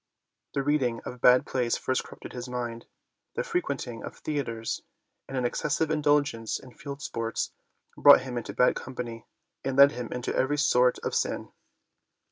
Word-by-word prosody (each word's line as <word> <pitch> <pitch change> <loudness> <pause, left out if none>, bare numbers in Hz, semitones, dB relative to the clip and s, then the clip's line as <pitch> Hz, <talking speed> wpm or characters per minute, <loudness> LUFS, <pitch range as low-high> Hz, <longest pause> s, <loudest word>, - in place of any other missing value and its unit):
The 140 - +1
reading 135 -5 +1
of 125 -1 -7
bad 125 +1 +6
plays 125 -3 0
first 130 - -1
corrupted - - -11
his 125 0 -6
mind; 120 -2 -4 0.5
the - - 0
frequent 140 -6 -2
ing 115 -2 -7
of - - -7
theatres 115 -7 -3 0.5
and 135 - -4
an 125 - 0
excessive 150 +5 0
indulgence 145 -7 +1
in 130 -2 -14
field 140 +2 -8
sports 115 0 -2 0.4
brought - - +8
him 130 -2 -6
into 120 -4 -4
bad 125 +5 +3
company 120 -3 -6 0.4
and 135 0 -2
led 140 0 +9
him 125 -5 -6
into 125 0 -3
every 145 +3 +1
sort 125 -3 +4
of - - -2
sin. - - -1
125 Hz, 165 wpm, -28 LUFS, 120-140 Hz, 0.5 s, led